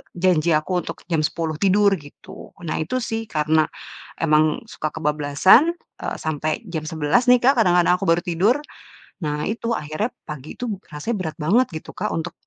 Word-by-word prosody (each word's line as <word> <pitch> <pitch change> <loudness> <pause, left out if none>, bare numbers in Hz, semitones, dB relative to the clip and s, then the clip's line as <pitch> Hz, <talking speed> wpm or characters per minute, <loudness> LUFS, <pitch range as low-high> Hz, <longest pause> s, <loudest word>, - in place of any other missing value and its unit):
janji 175 -2 +2
aku 180 +4 0
untuk - - -8
jam 165 - +2
10.00 160 0 -2
tidur, 200 +1 +4
gitu, 155 +6 -13
nah 160 - -2
itu 165 +11 -2
sih 225 -1 -3
karena 155 -2 +2 0.5
emang 155 -1 +2
suka 155 - -3
kebablasan, 155 - +4 0.2
eee, - - -4
sampe 155 +2 -2
jam 160 -3 -3
11.00 160 - +1
nih 245 -1 +5
Kak 265 0 +4
kadang-kadang 180 -4 +4
aku 195 - -3
baru 165 +1 +3
tidur, 190 +6 +2 0.7
nah 150 0 -2
itu, 230 +1 -2
akhirnya 155 +9 -2 0.2
pagi 150 -1 -7
itu 250 - -5 0.2
rasanya 170 +9 -3
berat 160 -4 -4
banget 230 +11 +4
gitu 155 - -8
Kak - - -3
untuk 165 +1 -3
165 Hz, 170 wpm, -22 LUFS, 155-205 Hz, 0.7 s, nih